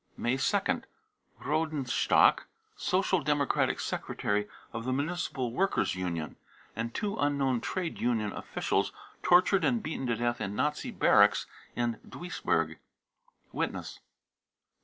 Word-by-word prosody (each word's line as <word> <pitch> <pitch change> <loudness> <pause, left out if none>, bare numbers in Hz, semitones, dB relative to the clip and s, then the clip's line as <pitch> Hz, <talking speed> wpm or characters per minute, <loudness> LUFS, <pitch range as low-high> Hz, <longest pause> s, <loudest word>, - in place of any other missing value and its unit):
May 120 +2 +1
2nd. 135 - +1 0.5
rodenstock, 155 -4 +2 0.3
Social 185 - +1
Democratic 145 -2 +1
secretary 105 0 -1 0.3
of 115 -1 -4
the 130 - -1
Municipal 140 -4 -2
Workers' 195 +8 +1
ynion, 85 -4 -3 0.4
and 115 +1 -3
two 210 - -2
unknown 140 - +1
trade 180 -3 -3
union 110 -4 0
officials, - - -1 0.3
tortured 185 +2 +5
and 235 -3 +2
beaten 145 -4 -3
to 120 - +1
death 120 +1 -1
in 100 +1 -3
Nazi 150 +5 -1
barracks - - +4 0.3
in 120 -2 -1
Duisburg. 180 +1 -2 0.7
(Witness.) - - -3
135 Hz, 115 wpm, -30 LUFS, 115-175 Hz, 0.7 s, tortured